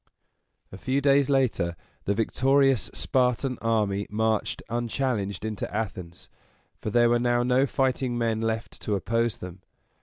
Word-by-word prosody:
A 95 - -10
few 130 +5 0
days 140 0 +3
later 125 -11 +1 0.3
the 100 - +1
victorious 135 +3 +2
Spartan 125 0 0
army 105 -3 0
marched 110 0 -1
unchallenged 120 -3 -2
into 110 -3 -4
Athens, 95 -5 -5 0.5
for - - -3
there 120 +2 +4
were 120 - +3
now 120 0 +2
no 125 +2 +3
fighting 130 -2 0
men 115 -2 0
left 110 -1 -3
to 105 - -1
oppose 115 +3 0
them. 90 +1 -9
115 Hz, 140 wpm, -26 LUFS, 105-130 Hz, 0.5 s, there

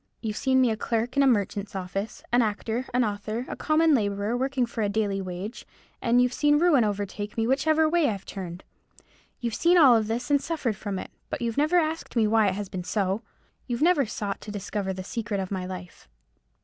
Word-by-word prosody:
You've 215 -2 -4
seen 260 +1 +2
me 250 -3 +3
a - - 0
clerk 230 +2 -2
in 280 - +4
a 275 - +5
merchant's 205 -4 0
office; 195 +3 -4
an 245 - +5
actor; 225 +3 -2
an 250 +1 +2
author; 215 +3 -3
a - - -5
common 315 0 +3
labourer, 205 -2 0
working 260 0 0
for 235 -1 -5
a 205 - +1
daily 200 -2 0
wage; 185 +5 -6 0.4
and 240 +1 +3
you've 250 0 +3
seen 295 +2 +3
ruin 305 -6 +4
overtake 205 0 -3
me 225 - +1
whichever 310 +5 +3
way 330 -3 +3
I've 200 -3 -4
turned. 180 -2 -7 0.8
You've 235 -2 -2
seen 345 +7 +4
all 255 -8 +7
this, 230 +5 -3
and 285 -1 +4
suffered 285 -10 -2
from 200 -1 -4
it; - - -7 0.2
but - - -3
you've 230 -1 -1
never 305 +5 +3
asked 320 -3 -1
me 225 -2 +4
why 215 0 +3
it 185 - 0
has 205 0 -4
been 185 -1 -5
so. 195 +2 -1 0.5
You've 245 +2 -1
never 315 -7 +4
sought 205 -2 -4
to - - -9
discover 205 -1 -3
the 185 0 -5
secret 210 0 -3
of 190 0 -4
my 185 -2 -3
life." 180 - -9
225 Hz, 215 wpm, -26 LUFS, 200-260 Hz, 0.8 s, all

